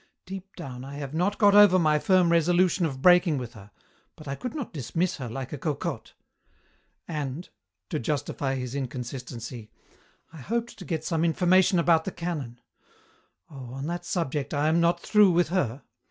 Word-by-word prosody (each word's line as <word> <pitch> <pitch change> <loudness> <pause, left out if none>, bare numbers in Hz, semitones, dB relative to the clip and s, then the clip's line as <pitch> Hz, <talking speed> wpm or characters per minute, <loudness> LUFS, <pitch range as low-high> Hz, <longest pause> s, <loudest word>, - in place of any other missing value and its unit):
Deep 195 +1 -9
down, 130 -7 -8
I 140 +1 -8
have 140 -1 -6
not 180 +5 0
got 205 -2 +5
over 205 -3 +7
my 155 -3 +3
firm 185 0 +3
resolution 175 +1 +3
of 135 -3 -7
breaking 175 -3 +5
with 125 -2 -6
her, 100 -3 -13 0.5
but 155 - -13
I 135 - -2
could 250 - -6
not 275 -10 -5
dismiss 165 +5 -2
her 125 -4 -6
like 130 +3 -6
a 145 - -5
cocotte. 150 0 -4 0.9
And," 150 +1 -4 0.4
to - - -1
justify 135 0 -2
his 125 -1 -4
inconsistency, 125 -3 -6 0.6
"I - - -10
hoped 230 - -3
to 185 - -9
get 160 -2 -3
some 165 -2 0
information 180 +3 +3
about 165 -1 +3
the 195 - -3
canon. 150 -10 -5 0.9
Oh, 130 -4 -10
on 135 +1 -5
that 175 +2 -4
subject 150 -8 -2
I 145 +2 +2
am 165 +2 +3
not 170 +1 +2
through 210 +2 +4
with 175 -2 +2
her. 140 -8 -1
160 Hz, 175 wpm, -26 LUFS, 135-180 Hz, 0.9 s, over